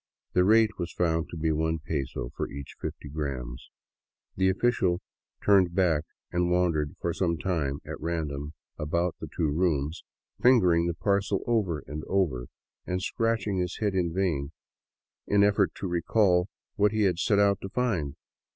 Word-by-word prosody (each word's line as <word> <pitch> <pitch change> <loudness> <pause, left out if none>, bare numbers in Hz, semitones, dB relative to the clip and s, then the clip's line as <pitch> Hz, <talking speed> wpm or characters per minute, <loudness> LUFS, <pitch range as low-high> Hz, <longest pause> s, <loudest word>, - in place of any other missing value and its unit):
The 90 - +4
rate 110 +1 +4
was 85 -1 -3
found 80 -2 0
to 85 - -7
be 80 0 +1
one 80 +1 0
peso 70 -6 -4
for - - -3
each 70 0 -8
fifty - - -5
grams. 70 -5 -5 0.7
The 95 0 +3
official 95 -3 +1 0.5
turned 95 -4 +4
back 85 -5 +2 0.3
and 90 0 +1
wandered 85 -5 +1
for 85 - -1
some 85 -2 0
time 75 -6 -1
at - - -7
random 75 -3 -3 0.3
about 85 +3 0
the - - -6
two 80 - -1
rooms, 80 -2 0 0.4
fingering 90 -10 +5
the 85 - -1
parcel 100 +1 0
over 100 -10 0
and 75 +2 -6
over 75 -11 0 0.4
and 90 0 -1
scratching 110 0 0
his 90 -1 -2
head 105 -3 0
in 90 -3 +1
a - - -8
vain 80 -7 0 0.8
effort 100 0 +3
to 95 - -4
recall 90 +1 +2 0.3
what 105 0 +4
he 110 -1 +1
had 90 -4 +2
set 105 +1 +2
out 100 -1 +3
to 95 - -5
find. 95 - -1
90 Hz, 160 wpm, -28 LUFS, 80-100 Hz, 0.8 s, fingering